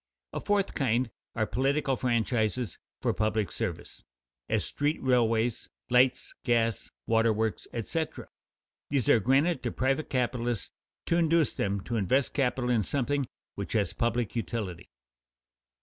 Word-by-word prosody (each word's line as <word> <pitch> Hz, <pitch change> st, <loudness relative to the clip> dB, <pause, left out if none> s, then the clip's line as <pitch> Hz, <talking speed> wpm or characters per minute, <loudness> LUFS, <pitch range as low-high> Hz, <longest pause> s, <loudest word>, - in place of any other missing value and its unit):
A -, -, -2 dB
fourth 205 Hz, -1 st, +1 dB
kind 125 Hz, -3 st, +1 dB, 0.2 s
are 110 Hz, -, +1 dB
public 135 Hz, +7 st, 0 dB
franchises 115 Hz, -3 st, 0 dB, 0.2 s
for -, -, +2 dB
public 110 Hz, -1 st, 0 dB
service, 105 Hz, -8 st, -5 dB, 0.5 s
as -, -, +1 dB
street 145 Hz, +2 st, 0 dB
railways, 120 Hz, -2 st, +2 dB, 0.2 s
lights, 125 Hz, 0 st, +3 dB
gas, 115 Hz, -4 st, +1 dB, 0.2 s
waterworks, 110 Hz, -1 st, +1 dB
etc. 155 Hz, +8 st, -3 dB, 0.6 s
These 135 Hz, -5 st, +1 dB
are 115 Hz, -, +6 dB
granted 135 Hz, -, +2 dB
to 120 Hz, -, -2 dB
private 135 Hz, +4 st, 0 dB
capitalists 120 Hz, -4 st, -1 dB, 0.3 s
to 170 Hz, -, +2 dB
induce 165 Hz, -2 st, +3 dB
them 100 Hz, 0 st, -1 dB
to 115 Hz, +4 st, -3 dB
invest 130 Hz, +7 st, +2 dB
capital 125 Hz, -3 st, +1 dB
in 115 Hz, -3 st, +3 dB
something 140 Hz, +5 st, 0 dB, 0.3 s
which -, -, -5 dB
has -, -, +1 dB
public 120 Hz, -1 st, -1 dB
utility. 105 Hz, -7 st, -3 dB
120 Hz, 130 wpm, -29 LUFS, 110-135 Hz, 0.6 s, are